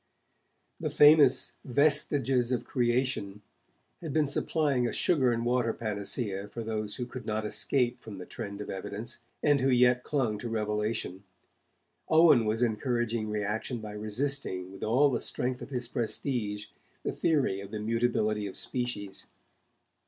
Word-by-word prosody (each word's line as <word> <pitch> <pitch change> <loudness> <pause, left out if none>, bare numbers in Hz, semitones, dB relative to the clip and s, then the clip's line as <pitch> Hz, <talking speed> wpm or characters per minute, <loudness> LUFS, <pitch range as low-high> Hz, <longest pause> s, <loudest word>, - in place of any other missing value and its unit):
The - - -2
famous 145 -3 +6
'Vestiges 135 -2 +2
of 125 - -1
Creation' 120 -5 -1 0.6
had 160 -4 -5
been 155 -1 +3
supplying 140 -3 +1
a - - -2
sugar 135 -8 +2
and 115 0 -1
water 120 -1 +1
panacea 100 -1 -2
for 115 +3 -6
those 110 -2 -3
who 125 - -4
could 130 +1 -9
not 110 0 -1
escape 125 +3 +1
from 105 -3 -9
the 90 - -8
trend 100 +2 -7
of - - -6
evidence, 105 +5 -4 0.2
and 145 -2 +4
who 135 - +2
yet 125 0 +4
clung 120 -8 -1
to 120 - -5
revelation. 105 -3 -2 0.9
Owen 155 -7 +6
was 110 +3 +1
encouraging 115 -1 -1
reaction 105 +4 -2
by 105 -1 -7
resisting, 105 -3 -1
with 95 - -9
all 135 +6 +3
the 120 - -1
strength 125 0 -1
of - - -8
his 125 -3 -2
prestige, 115 -3 -1 0.4
the - - -1
theory 140 -12 +1
of 100 - -9
the 110 0 -5
mutability 110 -2 0
of 95 - -8
species. 105 -6 -3
120 Hz, 150 wpm, -29 LUFS, 105-130 Hz, 0.9 s, famous